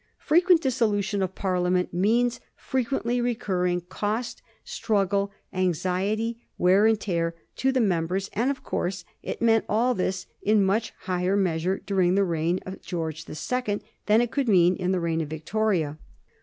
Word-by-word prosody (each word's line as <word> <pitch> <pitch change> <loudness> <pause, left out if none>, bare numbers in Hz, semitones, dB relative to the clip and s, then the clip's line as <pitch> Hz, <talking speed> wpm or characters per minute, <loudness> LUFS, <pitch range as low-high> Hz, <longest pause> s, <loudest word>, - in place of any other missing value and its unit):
Frequent 345 +2 +4
dissolution 210 -6 +1
of 190 0 -2
Parliament 180 -1 0
means 230 +7 +2 0.2
frequently 245 -1 -1
re 240 0 0
curring 180 -5 -1
cost, 210 +5 -3 0.2
struggle, 200 -2 0 0.2
anxiety, 190 +6 -1 0.2
wear 190 +4 +5
and 220 -1 +3
tear, 170 -4 -1 0.2
to 265 - +2
the 260 - +1
mem 175 -8 +1
bers; 190 +3 -2
and, 235 +6 +1
of 280 - -3
course, 180 0 -3 0.2
it - - -5
meant 225 -1 +4
all 235 +5 +2
thia 185 -3 -2 0.2
in 210 -1 +3
much 215 +4 0
higher 185 +1 0
measure 185 0 0
during 185 -2 +2
the 200 - +4
reign 170 0 0
of 190 +1 -8
George 160 -2 -4
the - - -8
Second 215 +3 -2 0.2
than 215 +2 +5
it 240 -1 -1
could 275 -4 0
mean 180 -2 +5
in 180 0 -1
the 185 - +1
reign 165 -1 0
of 155 - -3
Victoria. 160 -1 -1
195 Hz, 165 wpm, -26 LUFS, 180-225 Hz, 0.2 s, wear